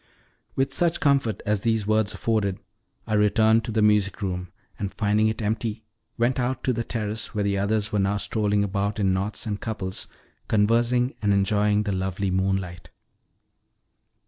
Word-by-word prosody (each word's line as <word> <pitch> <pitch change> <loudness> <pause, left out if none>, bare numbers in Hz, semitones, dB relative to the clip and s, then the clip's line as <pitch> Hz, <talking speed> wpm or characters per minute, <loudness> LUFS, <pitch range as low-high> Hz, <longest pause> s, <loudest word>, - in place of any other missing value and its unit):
With 135 0 0
such 170 +3 +1
comfort 140 - +1
as 105 -1 0
these 110 -2 +1
words 110 -1 +1
afforded 105 -4 0 0.5
I - - -3
returned 110 +2 +4
to - - -4
the 110 -1 +1
music 105 -1 +2
room, 90 -2 -3 0.3
and, 100 -1 -3
finding 110 0 +2
it 110 +1 -2
empty, 110 +1 -2 0.3
went 120 +3 +1
out 130 +1 -1
to 130 - +1
the 115 0 -2
terrace, 110 -1 -4
where 105 - 0
the 100 -1 0
others 105 +1 0
were 105 - +1
now 100 +1 +1
strolling 105 -1 0
about 100 +2 -1
in 95 -2 +2
knots 100 +3 -2
and 105 -2 -3
couples, 95 -4 -4 0.4
conversing 120 +4 +2
and 105 -2 +2
enjoying 105 +1 +2
the 105 - -2
lovely 95 0 -2
moonlight. 95 -2 -1
105 Hz, 165 wpm, -25 LUFS, 100-110 Hz, 0.5 s, returned